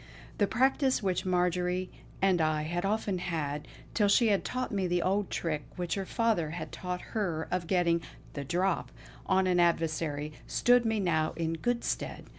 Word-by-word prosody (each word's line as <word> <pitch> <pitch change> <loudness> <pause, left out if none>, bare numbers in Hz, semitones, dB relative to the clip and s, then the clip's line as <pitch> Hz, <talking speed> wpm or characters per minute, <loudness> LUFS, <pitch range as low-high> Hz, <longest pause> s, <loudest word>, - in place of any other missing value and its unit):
The 205 - +4
practice 265 +2 +2
which 185 -1 0
Marjory 180 0 +1 0.3
and 185 -3 +4
I 155 -1 +1
had 175 +4 -2
often 200 -2 0
had, 150 -4 -3 0.3
till 210 -2 +3
she 220 +3 +5
had 200 -2 +2
taught 255 0 -3
me 195 -3 0
the 175 0 +1
old 195 +1 +1
trick 155 -3 -2
which 175 -2 -2
her 195 -2 -3
father 225 -9 +1
had 170 +3 -6
taught 180 -1 -4
her 175 -8 -1
of 180 -2 -1
getting 170 -2 +2 0.3
"the 140 - -4
drop" 180 +5 0 0.4
on 190 0 +3
an 180 -1 +2
adversary, 155 -3 +1
stood 245 -1 +4
me 220 -1 +1
now 160 -5 +1
in 165 0 -1
good 240 +8 -1
stead. - - -3
180 Hz, 175 wpm, -30 LUFS, 165-200 Hz, 0.4 s, she